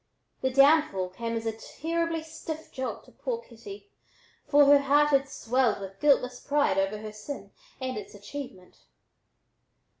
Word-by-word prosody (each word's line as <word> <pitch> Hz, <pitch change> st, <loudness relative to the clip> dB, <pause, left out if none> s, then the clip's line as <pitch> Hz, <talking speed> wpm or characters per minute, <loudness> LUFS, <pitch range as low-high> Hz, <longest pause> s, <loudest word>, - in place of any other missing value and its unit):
The 260 Hz, -, +1 dB
downfall 275 Hz, -, +4 dB
came 230 Hz, +5 st, -4 dB
as 225 Hz, -, -5 dB
a 225 Hz, -, +1 dB
terribly 325 Hz, +8 st, -3 dB
stiff 315 Hz, 0 st, -7 dB
jolt 260 Hz, -1 st, -4 dB
to -, -, -18 dB
poor -, -, -3 dB
kitty, 410 Hz, -4 st, -12 dB, 0.6 s
for 290 Hz, 0 st, +6 dB
her 285 Hz, 0 st, +7 dB
heart 290 Hz, +2 st, +4 dB
had 275 Hz, -1 st, +2 dB
swelled 250 Hz, -4 st, +1 dB
with 195 Hz, 0 st, -9 dB
guiltless 250 Hz, -4 st, +3 dB
pride 285 Hz, -9 st, +1 dB
over 195 Hz, +2 st, 0 dB
her 215 Hz, 0 st, -7 dB
sin 215 Hz, +7 st, -8 dB, 0.3 s
and 260 Hz, -1 st, -3 dB
its 210 Hz, 0 st, -8 dB
achievement. 205 Hz, -3 st, -9 dB
275 Hz, 150 wpm, -28 LUFS, 220-295 Hz, 0.6 s, her